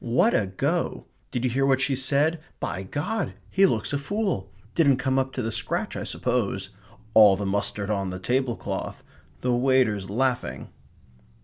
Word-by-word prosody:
What 120 0 +3
a 100 - +2
go! 95 0 -1 0.2
Did 125 - -3
you 130 - +2
hear 135 +3 +1
what 135 -1 +3
she 135 0 +1
said? 145 +5 +1 0.2
By 85 +4 -3
God, 170 - -3 0.2
he 195 0 +5
looks 115 - -1
a 140 - +1
fool! 190 - -2 0.2
Didn't 140 -6 +4
come 130 0 +1
up 135 0 -1
to 125 - -2
the 115 - -2
scratch, 110 0 -2
I - - -4
suppose. 100 -6 -1 0.4
All 105 -3 +8
the 100 +1 -3
mustard 100 +1 -1
on 100 -2 -1
the 95 - -4
tablecloth. 120 +5 -2 0.4
The 125 -1 +1
waiters 120 -6 +2
laughing." 125 +4 -1
125 Hz, 170 wpm, -25 LUFS, 100-135 Hz, 0.4 s, All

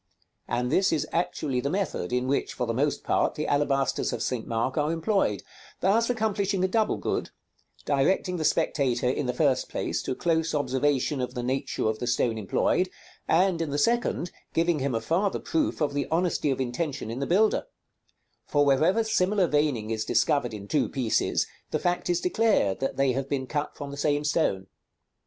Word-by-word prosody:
And 125 +1 -1
this 190 +5 +3
is 155 - 0
actually 160 -6 -1
the 140 - -1
method 180 - -2
in 125 +1 0
which, 140 - -1
for 125 - -1
the 115 - -2
most 145 +5 0
part, - - +1
the 150 - -2
alabasters 140 -1 +1
of - - -3
St. 125 -3 -2
Mark 115 +3 -1
are 150 0 +1
employed; 165 - 0 0.4
thus 225 +5 +2
accomplishing 205 -5 0
a - - +4
double 215 +3 +1
good, - - -2 0.6
directing 180 +6 +1
the 160 - -2
spectator, 130 -5 +1
in 130 +2 0
the - - +1
first 135 -1 +1
place, - - -2
to 130 - -3
close 165 0 0
observation 145 0 0
of 125 +1 -4
the 125 - -3
nature 130 0 -2
of 110 0 -1
the 125 - -3
stone 120 -2 +1
employed, 180 - +1 0.4
and 175 0 +3
in 165 - -2
the 145 - -2
second, 230 0 +1 0.2
giving 165 -1 +2
him 135 -2 -1
a 115 - -1
farther 185 - 0
proof 160 - -1
of 145 -2 +1
the 145 -1 -1
honesty 165 -2 +1
of 135 - 0
intention 130 -1 -3
in 120 - -4
the 140 - -2
builder: 215 - +2 0.8
for 145 -1 +3
wherever 160 +11 +3
similar 205 -3 +2
veining 145 -8 0
is 110 -1 -1
discovered 120 +3 +1
in 100 -2 -8
two 150 - +1
pieces, 125 -5 0 0.2
the - - 0
fact 175 0 -1
is 175 -1 +2
declared 180 - +2
that 135 - -2
they 135 -1 +3
have 135 +2 -3
been 135 -2 -1
cut 145 +2 -3
from 140 -1 -6
the 140 - -7
same 145 0 +1
stone. 145 - 0
145 Hz, 190 wpm, -27 LUFS, 130-175 Hz, 0.8 s, a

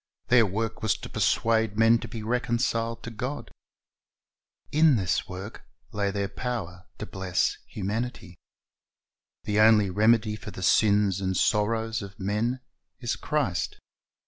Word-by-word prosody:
Their 120 -3 +6
work 110 +3 -3
was 110 -1 +1
to - - -9
persuade 110 -2 +1
men 115 +1 +5
to 120 - -7
be 110 0 -7
reconciled 115 -1 -1
to 120 - -6
God. 125 +1 -5 1.2
In 155 -1 +5
this 95 -3 0
work 95 +4 -8 0.3
lay 100 -1 -1
their 100 0 -2
power 95 -7 -5
to - - -5
bless 95 -2 -1
humanity. 105 -2 -4 1.1
The 105 0 0
only 110 -3 +5
remedy 110 +2 +3
for 105 - -9
the 95 -1 -7
sins 100 -1 +3
and 95 -1 -1
sorrows 110 +1 +1
of 100 0 -10
men 110 +6 -1 0.4
is 120 -2 -2
Christ. 140 -12 -2
110 Hz, 135 wpm, -27 LUFS, 100-115 Hz, 1.2 s, Their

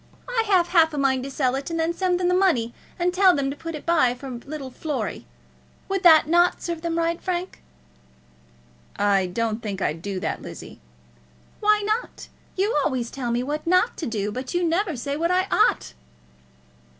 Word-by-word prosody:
I - - 0
have 360 -4 +3
half 325 -3 +4
a - - -4
mind 265 -2 +1
to - - -5
sell 260 -2 0
it, 275 +3 -3
and 330 -1 -3
then 325 +1 +1
send 360 0 0
them 360 - +1
the 360 - +2
money, 325 -12 +2 0.2
and 355 0 0
tell 370 -1 +5
them 275 -1 -1
to - - -6
put 330 +2 -6
it 300 - -9
by 305 -8 +3
for 265 +1 -8
my 240 - -6
little 280 -3 -6
Flory. 295 +2 -4 0.6
Would 390 -1 -1
not 320 -3 +8
that 345 +3 +3
serve 340 -2 -4
them 335 0 -2
right, 335 0 0
Frank?" 365 0 -4 1.3
"I 200 -2 +2
don't 225 +4 -2
think 200 -3 -4
I'd 165 -3 -2
do 195 0 -4
that, 195 - -3
Lizzie." - - -10 0.8
"Why 425 0 +3
not? 435 +3 -3 0.3
You 400 +4 0
always 250 -4 -1
tell 255 -3 -4
me 240 +1 0
what 300 +4 -4
not 365 +6 +3
to 320 - -4
do, 210 -3 -2
but 255 +7 -5
you 350 -1 +1
never 345 0 0
say 280 +4 -3
what 335 +3 0
I 365 +1 +2
ought!" 60 - +2
320 Hz, 200 wpm, -24 LUFS, 250-355 Hz, 1.3 s, not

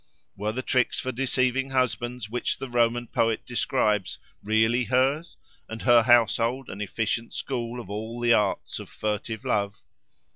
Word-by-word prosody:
Were 105 +2 -2
the 130 +4 -4
tricks 125 -1 +1
for 130 - -2
deceiving 130 +1 0
husbands 125 -3 -1
which 120 +3 -2
the 135 - -5
Roman 120 0 +1
poet 115 -1 0
describes, 105 -5 0 0.2
really 110 +3 +2
hers, 135 +7 +1 0.3
and 110 0 -6
her 120 -2 +6
household 120 +2 +3
an 100 - -7
efficient 115 +3 -2
school 120 -2 -3
of 115 - -8
all 110 +4 -5
the 120 0 +4
arts 105 -3 0
of - - -9
furtive 110 +1 -3
love? 100 -1 -1
120 Hz, 150 wpm, -26 LUFS, 110-125 Hz, 0.3 s, her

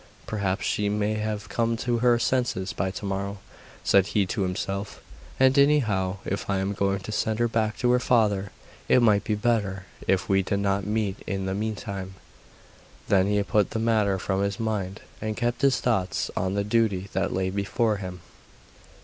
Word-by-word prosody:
'Perhaps 100 -3 -2
she 105 -1 0
may 105 +1 0
have 105 -1 -3
come 115 +1 0
to 120 0 0
her 120 0 +4
senses 120 -6 0
by 95 - -1
to 95 +2 -6
morrow,' 100 +1 -3 0.5
said 100 -1 +4
he 100 -1 +1
to 100 +3 -3
himself; 95 +2 -3 0.4
'and, 130 +1 +5
anyhow, 110 -10 +3
if 100 +2 -3
I 100 - +1
am 95 +1 -1
going 100 0 0
to 95 - -6
send 110 +1 0
her 120 +1 +2
back 110 -1 0
to 125 - +2
her 125 - +4
father, 105 -6 +2 0.4
it - - +6
might 105 -3 +4
be 105 - 0
better 105 -4 0 0.2
if 95 -2 +2
we 95 0 +3
did 100 +1 -1
not 100 0 0
meet 105 -2 -1
in 95 -1 -2
the 95 - -1
meantime! 100 -2 -4 0.9
Then 95 -1 +4
he 105 0 +2
put 100 +1 +2
the - - -4
matter 110 -4 +2
from 95 +1 -1
his 100 0 -1
mind, 105 -3 -2 0.2
and 110 0 -3
kept 120 0 -1
his 135 -2 +3
thoughts 100 -7 0
on 95 +1 -1
the 100 - +1
duty 105 -3 +1
that 95 +1 0
lay 95 0 -1
before 100 +2 0
him. 90 -3 -7
100 Hz, 185 wpm, -26 LUFS, 95-110 Hz, 0.9 s, it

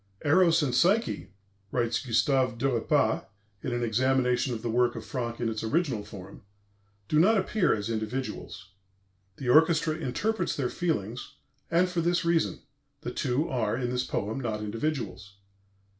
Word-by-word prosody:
"Eros 165 +1 +4
and 130 -4 0
Psyche," 210 +6 +2 0.4
writes 120 0 0
Gustave 130 +1 +2
Derepas 130 0 +1 0.4
in - - -3
an 120 0 -1
examination 125 +2 +2
of 115 -1 -4
the 120 - -1
work 125 +1 +2
of 115 -1 -7
Franck 115 +1 -4
in 120 - 0
its 110 -1 -3
original 130 -3 0
form, 100 -3 -11 0.7
"do 150 - +3
not 215 +7 +5
appear 195 +1 +2
as 105 -1 -4
individuals. 110 -3 -4 0.7
The 130 - -3
orchestra 160 +2 +4
interprets 185 - -1
their 130 -4 -1
feelings, 125 - -3 0.3
and 175 +2 +3
for 180 -1 -1
this 170 0 +1
reason: 165 - +1 0.4
the - - -4
two 135 +6 0
are 115 -3 -1
in 125 -1 -2
this 125 0 0
poem 110 +1 -3
not 110 -4 -2
individuals. 105 -4 -4
125 Hz, 150 wpm, -28 LUFS, 115-160 Hz, 0.7 s, not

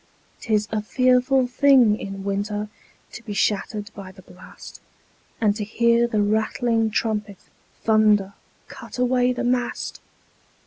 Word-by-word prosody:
'Tis 215 -2 0
a 215 -1 -1
fearful 255 +3 +2
thing 250 -3 +4
in 195 -2 -7
winter 205 +1 -3 0.4
To - - -9
be 210 -3 -7
shattered 210 +1 -1
by 195 -2 -10
the 190 0 -17
blast, 180 +1 -14 0.6
And 210 -2 +2
to 215 - -4
hear 235 +2 +2
the 215 -3 0
rattling 220 +2 0
trumpet 210 -2 -2 0.5
Thunder, 210 -3 +3 0.3
"Cut - - -11
away 250 0 +2
the 250 - -3
mast!" 245 0 -2
220 Hz, 130 wpm, -22 LUFS, 205-245 Hz, 0.6 s, thing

